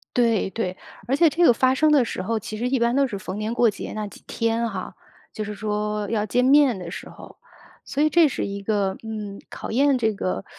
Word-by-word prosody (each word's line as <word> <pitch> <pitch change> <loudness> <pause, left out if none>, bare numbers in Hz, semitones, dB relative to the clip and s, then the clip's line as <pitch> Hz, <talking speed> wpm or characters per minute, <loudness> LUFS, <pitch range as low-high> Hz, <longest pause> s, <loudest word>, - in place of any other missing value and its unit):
对， 230 -5 +2
对， 185 -2 -3 0.3
而 265 - +2
且 325 +3 +5
这 335 +4 +1
个 245 - +7
发 260 +3 +3
生 310 +3 +3
的 285 -4 +5
时 230 -5 -4
候， 225 +4 -1
其 215 +1 -7
实 245 +2 -1
一 265 0 +1
般 235 +2 +2
都 275 0 +4
是 205 -5 -5
逢 190 +1 -6
年 215 +2 -2
过 240 -1 +4
节 205 - -6
那 215 -1 -4
几 - - -14
天 230 0 -1
哈， 190 -3 -6 0.4
就 215 - -5
是 210 - -5
说 210 0 -2
要 215 -2 0
见 245 +4 +1
面 275 -3 +5
的 180 -2 -7
时 - - -8
候。 - - -13 0.5
所 285 - 0
以 310 - +4
这 335 0 +5
是 275 - -3
一 200 0 -5
个 200 -2 0
嗯， 210 -3 -6
考 - - -7
验 275 +2 +3
这 220 -2 +1
个 195 -1 -3
225 Hz, 255 characters per minute, -23 LUFS, 205-255 Hz, 0.5 s, 个